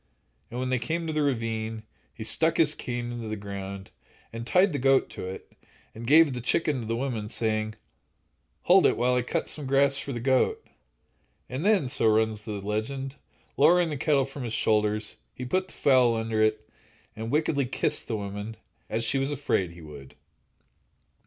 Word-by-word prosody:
And 120 - -5
when 130 0 -2
they 130 -1 +1
came 160 +8 -2
to 160 - -3
the 155 - +1
ravine, 115 -5 -2 0.3
he 110 - -8
stuck 160 +8 +2
his 155 -2 +4
cane 120 -4 -4
into 120 -2 -5
the 110 - -3
ground, 100 -1 -7 0.4
and 115 +1 -6
tied 185 +2 +4
the 145 - -1
goat 135 +1 +3
to - - -6
it, 95 - -9 0.4
and 115 +1 -8
gave 155 0 +6
the 125 - -4
chicken 145 +3 +1
to 110 - -6
the 115 - -1
woman, 115 -4 -3
saying: 110 -1 -1 0.9
"Hold - - +6
it - - +1
while 125 +1 +2
I 125 - +2
cut 120 - -2
some 150 -3 -4
grass 135 0 +3
for 140 - -5
the 120 - -3
goat," 135 - +1 0.8
and 130 +5 -4
then—so 185 - +2
runs 110 -1 +2
the 110 - -4
legend—lowering 135 - 0
the - - -2
kettle 140 -1 +2
from 135 +1 -9
his 115 -2 -4
shoulders, 105 -1 0 0.2
he 125 - -6
put 185 +8 0
the - - -16
fowl 125 -4 +4
under 110 -1 -1
it, 110 0 +1 0.5
and 110 +1 -5
wickedly 145 -1 +1
kissed - - 0
the 110 - -2
woman, 105 +2 -6 0.3
as 115 +1 -1
she 130 +4 +1
was 135 +2 -1
afraid 130 -10 0
he 85 0 -13
would. 75 -4 -12
120 Hz, 185 wpm, -27 LUFS, 110-140 Hz, 0.9 s, gave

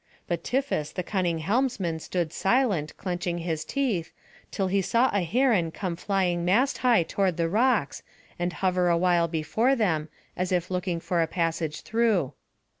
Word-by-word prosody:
But 175 - -2
Tiphys 255 - -1
the 180 - -3
cunning 175 -3 -1
helmsman 195 -4 0
stood 170 -1 -3
silent, 195 - +1
clenching 175 -1 -3
his 165 -2 -3
teeth, 230 - -1 0.4
till 195 - -1
he 195 +1 +1
saw 235 +7 +2
a 200 - +2
heron 210 -2 +2
come 175 +1 -4
flying 180 -2 0
mast 235 +11 +2
high 240 -8 +4
toward 185 0 0
the 165 -1 +1
rocks, 215 - +1 0.4
and 175 +1 0
hover 180 -1 +1
awhile 170 0 +3
before 170 - +1
them, 160 -10 0 0.3
as 180 0 -2
if 180 0 0
looking 180 -2 -1
for 175 0 0
a 165 - +1
passage 165 -2 -2
through. 220 - +1
180 Hz, 160 wpm, -26 LUFS, 170-215 Hz, 0.4 s, high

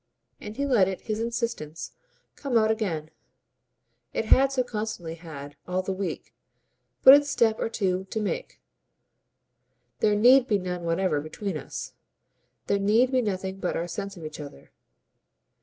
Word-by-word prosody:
And 210 +1 -8
he 280 - 0
let 235 -9 +4
it, 190 -1 -4
his 215 -1 -3
insistence, 230 -9 -3 0.4
come 270 -5 0
out 220 0 +4
again; 165 -9 -2 1.0
it - - 0
had 270 +4 +5
so 260 -2 +1
constantly 215 -8 -4
had, 145 -4 -9
all 185 +1 -1
the 190 - -2
week, 190 0 -5 0.7
but 265 - +11
its 290 0 +5
step 225 -5 +2
or - - -1
two 190 -4 -1
to 220 - -2
make. 215 - -4 1.4
"There 210 -1 +3
NEED 250 +4 +6
be 210 - +2
none 180 -2 -4
whatever 165 -2 +1
between 185 +5 -5
us. 150 - -6 0.7
There 200 - +1
need 220 +6 +3
be 260 -1 +3
nothing 190 -3 -3
but 180 - -1
our 170 - -2
sense 195 +2 -5
of 165 - -8
each 155 0 -7
other." 140 - -11
200 Hz, 155 wpm, -26 LUFS, 175-230 Hz, 1.4 s, but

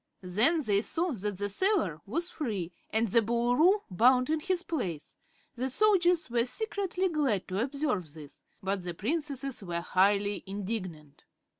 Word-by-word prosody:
Then 235 - +4
they 205 -4 +2
saw 340 +9 -1
that 205 -5 -4
the 205 +1 -1
sailor 205 - 0
was 335 - -2
free 205 - -3 0.2
and 220 +2 +1
the 230 +4 +4
Boolooroo 245 - +3
bound 250 - +4
in 315 - +1
his 365 +2 -1
place. 185 - -4 0.4
The 260 +1 -2
soldiers 360 0 +3
were 235 -1 +1
secretly 380 - -2
glad 285 - 0
to 185 +1 -2
observe 260 - -2
this, 150 -2 -12 0.2
but 195 -1 -2
the 175 -1 -5
Princesses 275 - -3
were 175 -3 -3
highly 200 +3 +1
indignant. 185 -7 -6
235 Hz, 150 wpm, -29 LUFS, 195-315 Hz, 0.4 s, Then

